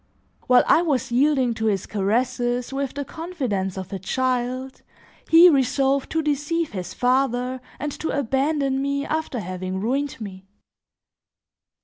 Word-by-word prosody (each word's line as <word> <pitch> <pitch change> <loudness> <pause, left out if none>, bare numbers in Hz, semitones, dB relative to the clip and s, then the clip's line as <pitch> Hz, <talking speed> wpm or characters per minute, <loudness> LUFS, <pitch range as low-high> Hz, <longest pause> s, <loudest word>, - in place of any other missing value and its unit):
While 250 -1 +6
I - - +5
was 280 -9 -1
yielding 260 -1 +3
to 220 0 -3
his 195 -3 0
caresses 245 +4 -1
with 275 -1 -3
the 285 0 -3
confidence 255 - -3
of 190 0 -6
a 195 - -3
child, 255 +4 -2 0.5
he 335 +2 +9
resolved 275 -2 +2
to 320 0 +1
deceive 300 +3 -1
his 185 -3 -6
father 255 0 +1 0.2
and 295 +1 -3
to 320 - -2
abandon 275 +1 0
me 280 0 -1
after 310 -5 -2
having 185 -1 -4
ruined 270 +7 -1
me. 195 -3 -8
260 Hz, 135 wpm, -23 LUFS, 230-285 Hz, 0.5 s, he